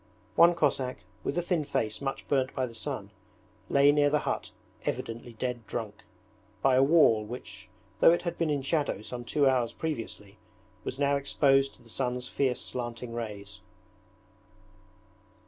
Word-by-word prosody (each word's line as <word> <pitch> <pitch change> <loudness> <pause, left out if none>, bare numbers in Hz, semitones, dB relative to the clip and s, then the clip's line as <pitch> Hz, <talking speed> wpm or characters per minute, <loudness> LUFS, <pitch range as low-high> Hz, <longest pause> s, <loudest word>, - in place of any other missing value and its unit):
One 170 +1 +7
Cossack, 130 -5 0 0.2
with - - -2
a 175 - +1
thin 175 -3 0
face 110 -5 -2
much 135 -1 -4
burnt 135 -2 +1
by 130 - +1
the 120 - -9
sun, 110 - -5 0.6
lay 140 +1 +6
near 145 0 +4
the 150 - +3
hut - - -2 0.3
evidently 115 +1 -4
dead 120 0 -4
drunk, 105 -2 -5 0.6
by 135 - +5
a 130 - +5
wall 135 -7 +5
which 105 -4 -9 0.3
though - - +8
it 175 - +1
had 170 -1 -2
been 165 -2 0
in 145 -2 0
shadow 145 -6 0
some 120 +2 -6
two 140 +3 +2
hours 125 -3 +2
previously 110 -9 -5 0.4
was 130 - -4
now 140 0 +2
exposed 135 -1 +2
to 120 - -20
the - - -19
sun's 125 +1 -2
fierce 130 -2 0
slanting 120 -1 -5
rays. 100 -4 -6
130 Hz, 160 wpm, -29 LUFS, 115-145 Hz, 0.6 s, though